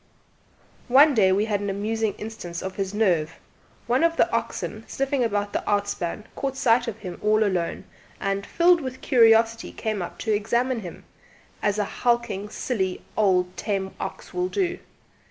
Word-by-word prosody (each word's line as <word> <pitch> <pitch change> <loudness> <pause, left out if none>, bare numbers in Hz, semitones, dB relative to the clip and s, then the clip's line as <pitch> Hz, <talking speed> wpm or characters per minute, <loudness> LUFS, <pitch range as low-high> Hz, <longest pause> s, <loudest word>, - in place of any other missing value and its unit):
One 280 +4 +7
day 195 -6 +4
we 200 +3 +2
had 210 -2 0
an 205 - -2
amusing 215 +2 -1
instance 195 -6 -6
of 190 0 -5
his 195 -1 -2
nerve: 175 -7 +1 0.5
one 250 +6 +2
of 335 0 +2
the - - +4
oxen, - - -3
sniffing 275 -1 0
about 205 -2 -1
the - - 0
outspan, 205 -2 -1
caught 270 -1 -3
sight 245 -2 +3
of 225 -2 -4
him 185 -5 -8
all 215 +1 +3
alone, 180 -5 -1 0.4
and 195 0 -1
filled 345 - +3
with 260 -1 -6
curiosity 230 -3 +4
came 215 -3 -3
up 175 - -6
to 220 - -1
examine 235 +4 0
him, 180 -5 -9 0.6
as 205 0 +1
a 210 - +1
hulking 235 -4 -1
silly 190 -6 -2
old 185 -3 +2
tame 195 -2 -2
ox - - -6
will 360 0 -1
do. 370 -3 -1
215 Hz, 165 wpm, -25 LUFS, 195-245 Hz, 0.6 s, One